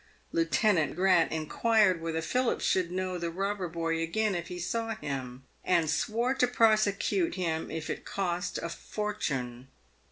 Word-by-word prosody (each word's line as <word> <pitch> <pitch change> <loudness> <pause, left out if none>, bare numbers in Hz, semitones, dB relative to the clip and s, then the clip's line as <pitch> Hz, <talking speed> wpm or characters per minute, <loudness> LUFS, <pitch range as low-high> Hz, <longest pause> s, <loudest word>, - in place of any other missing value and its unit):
Lieute 165 +5 +1
nant 160 -6 0
Grant 180 -2 +4
inquired 185 +4 +2
whether 165 0 -2
Philip 250 +6 +1
should 185 -2 +1
know 185 0 -2
the 170 0 -2
robber 195 +2 -2
boy 165 -1 -2
again 205 +6 0
if 170 -1 -3
he 180 - -6
saw 225 +5 -2
him, 130 -6 -5 0.2
and 170 -3 +2
swore 235 +3 0
to 265 -2 +2
prosecute 225 - +2
him 160 -3 -2
if 160 -1 -4
it - - -4
cost 180 -2 -2
a 170 - -4
fortune. 135 - -4
180 Hz, 155 wpm, -29 LUFS, 165-210 Hz, 0.2 s, Grant